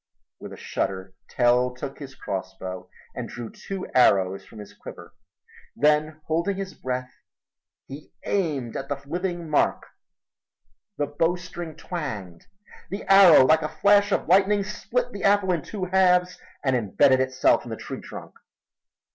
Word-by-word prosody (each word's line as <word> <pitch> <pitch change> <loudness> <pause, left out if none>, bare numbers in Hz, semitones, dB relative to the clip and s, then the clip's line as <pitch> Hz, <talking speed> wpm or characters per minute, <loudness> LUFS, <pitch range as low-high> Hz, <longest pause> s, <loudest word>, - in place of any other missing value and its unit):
With - - -9
a - - -9
shudder 95 0 -4 0.2
Tell 125 +1 +2
took 135 +2 -7
his 135 -2 -9
crossbow 95 -1 -6 0.2
and - - -6
drew 120 -2 -7
two 195 -1 -6
arrows 95 -6 +3
from 110 - -15
his 105 -1 -10
quiver. 85 - -12 0.6
Then 150 +1 +1
holding 170 +5 -1
his 195 -1 -5
breath 125 0 -4 0.7
he 140 +3 -11
aimed 145 - -1
at 135 +1 -5
the 145 -1 -3
living 175 +2 -3
mark. 150 - +1 1.1
The 145 - 0
bowstring 165 +1 -3
twanged. 105 - -6 0.4
The 195 - -5
arrow, 195 -8 +8
like 160 +4 +4
a 155 - -3
flash 200 +6 +3
of - - 0
lightning, 195 +3 +4
split 240 +4 -3
the 200 - -7
apple 200 -2 +3
in 170 -3 0
two 190 +4 -5
halves 180 -1 +2 0.2
and 130 -2 +2
imbedded 130 +4 +3
itself 130 0 +2
in - - -10
the - - -5
tree - - -7
trunk. - - -10
150 Hz, 145 wpm, -25 LUFS, 125-185 Hz, 1.1 s, arrow